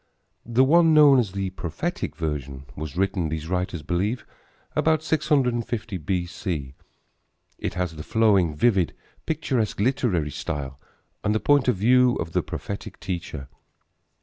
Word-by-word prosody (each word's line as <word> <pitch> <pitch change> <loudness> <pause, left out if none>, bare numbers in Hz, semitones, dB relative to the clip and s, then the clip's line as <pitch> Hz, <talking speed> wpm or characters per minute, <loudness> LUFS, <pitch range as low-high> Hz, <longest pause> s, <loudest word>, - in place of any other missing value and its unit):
The 120 +2 +4
one, 165 +3 +5
known 145 -3 +7
as 105 -6 -1
the 95 -1 -2
prophetic 85 -4 -4
version, 70 -4 -4
was 75 +2 -6
written, 95 -3 0
these 80 0 -4
writers 90 -3 -2
believe, 100 - -1 0.5
about 160 -1 +2
650 125 - 0
B.C. 85 -4 -3 0.9
It - - -3
has 90 -3 -2
the 75 - -7
flowing, 100 -5 +2
vivid, 95 -1 +2 0.3
picturesque, 130 -10 -1
literary 100 - +1
style 70 -1 -5 0.4
and 105 0 +1
the - - +2
point 145 0 +3
of 125 - +3
view 125 +5 +4
of 80 - -4
the - - +1
prophetic 100 - -6
teacher. 85 -7 -5
95 Hz, 135 wpm, -24 LUFS, 80-125 Hz, 0.9 s, known